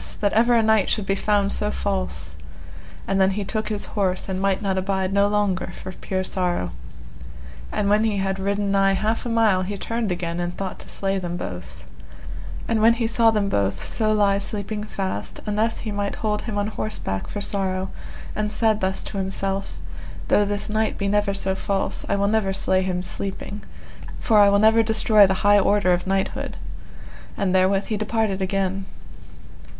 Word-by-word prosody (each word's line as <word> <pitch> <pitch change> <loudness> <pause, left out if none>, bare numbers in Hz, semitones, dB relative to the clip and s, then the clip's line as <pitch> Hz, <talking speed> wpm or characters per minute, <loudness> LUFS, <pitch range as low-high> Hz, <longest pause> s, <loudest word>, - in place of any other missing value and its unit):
that 205 -1 +1
ever 235 +2 +4
a 230 - +4
knight 220 -2 +3
should 210 -2 0
be 195 - +1
found 200 0 +1
so - - +1
false; 65 0 -3 0.7
and 195 0 +1
then 190 - +5
he 200 +1 -2
took 215 +2 -2
his 210 -1 -2
horse 190 -3 0
and 190 -1 -3
might 195 -1 +1
not 195 -2 -1
abide 190 0 -1
no 200 0 +4
longer 205 -3 0
for 185 - -7
pure 185 0 -3
sorrow. 180 - -1 1.0
And 205 - 0
when 210 +2 +4
he 215 -2 +1
had 195 0 -1
ridden 200 +1 0
nigh 195 0 +3
half 220 +4 -1
a - - -3
mile 220 -5 +3
he 200 +2 -3
turned 230 0 -2
again 175 -1 -3
and 175 0 -3
thought 195 -1 -4
to - - -8
slay 195 0 -1
them 175 -1 -4
both; 60 - -7 0.8
and 225 -1 +1
when 225 +1 +6
he 235 -1 -1
saw 230 0 +4
them 210 -2 +1
both 100 - 0
so 215 -2 0
lie 200 -2 +3
sleeping 210 +1 -3
fast, 190 - -4
unnethe 215 +2 0
he 220 - -4
might 205 -1 -2
hold 210 -1 -1
him 215 -3 -4
on 205 - +1
horseback 210 - -3
for 205 - -5
sorrow, 190 -2 -1 0.4
and 210 0 -1
said 220 -1 +2
thus 190 0 -1
to 200 - -5
himself, 195 +1 -3 0.5
Though 205 - +4
this 205 0 -2
knight 220 0 0
be 200 - -1
never 205 0 +1
so 190 -1 0
false, 195 0 -2
I - - +2
will 200 0 +1
never 210 -2 +1
slay 190 0 +2
him 180 -1 -2
sleeping, 200 +2 -5 0.6
for 220 -3 +3
I 205 -1 +7
will 200 - +4
never 220 +2 +5
destroy 215 -2 +5
the 190 - +1
high 205 0 +7
order 200 -2 +3
of 175 +1 -2
knighthood; 195 0 -1 0.8
and 190 -2 0
therewith 190 +1 +3
he 215 - 0
departed 215 -2 -1
again. 195 0 -1
200 Hz, 190 wpm, -23 LUFS, 190-210 Hz, 1.0 s, I